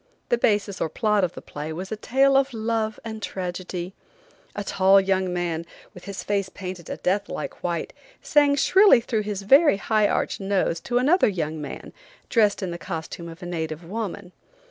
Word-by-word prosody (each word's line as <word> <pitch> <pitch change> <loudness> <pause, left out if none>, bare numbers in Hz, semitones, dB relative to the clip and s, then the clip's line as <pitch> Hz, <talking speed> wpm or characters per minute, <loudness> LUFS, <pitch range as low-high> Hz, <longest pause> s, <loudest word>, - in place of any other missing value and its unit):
The 240 - +3
basis 205 -3 +1
or 160 - 0
plot 210 +2 +1
of 180 -1 0
the - - -10
play 150 +2 -6
was 185 +5 -6
a - - -1
tale 270 +5 +2
of 270 -2 +2
love 220 -1 -1
and 220 -1 -6
tragedy. 180 -1 -5 0.6
A 205 - -3
tall 195 0 +4
young 190 -1 0
man, 175 -2 -2 0.3
with 180 - -13
his 200 -1 -6
face 200 -2 -1
painted 185 -4 -8
a - - -4
death 200 +3 0
like - - -6
white, 170 -2 -2 0.3
sang 290 -1 +3
shrilly 385 - +6
through 225 -2 -1
his 205 -1 -4
very 275 +3 +6
high 215 0 +2
arched - - -1
nose 195 -4 0
to 240 +6 -1
another 300 +9 +4
young 160 -6 -2
man, 145 - -8 0.4
dressed 210 -4 +2
in 180 - -3
the 170 - -6
costume 170 -1 -6
of 165 +3 -11
a - - -5
native 160 -2 -4
woman. 200 0 -5
195 Hz, 190 wpm, -24 LUFS, 175-220 Hz, 0.6 s, shrilly